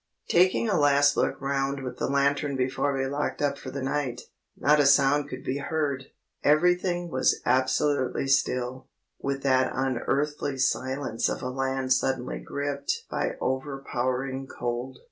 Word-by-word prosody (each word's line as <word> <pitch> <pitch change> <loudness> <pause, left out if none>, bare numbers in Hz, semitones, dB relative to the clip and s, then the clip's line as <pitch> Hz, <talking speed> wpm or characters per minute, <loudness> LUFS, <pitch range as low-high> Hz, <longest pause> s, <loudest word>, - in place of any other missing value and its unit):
Taking 185 +6 +4
a 200 -6 +2
last 145 0 +4
look - - 0
round 135 0 -1
with 125 - -6
the - - 0
lantern 140 +1 +1
before 130 +2 0
we 135 - 0
locked 140 +2 -2
up 140 -1 0
for 130 - -7
the 135 0 -5
night, 135 -3 -2 0.4
not 150 +1 +4
a 145 - +5
sound 140 +1 +4
could 130 +1 -7
be 135 +1 -2
heard; 140 -3 -2 0.4
everything 175 +3 +2
was 130 -1 +2
absolutely 130 +2 +1
still, 130 -1 0 0.3
with 135 0 -3
that 130 -1 +3
unearthly 135 +2 -1
silence 130 -2 0
of - - -4
a 125 - -2
land 130 0 0
suddenly 130 -1 -1
gripped 140 0 -3
by - - -1
overpowering 130 -1 -2
cold. 120 +2 -4
135 Hz, 145 wpm, -27 LUFS, 130-145 Hz, 0.4 s, a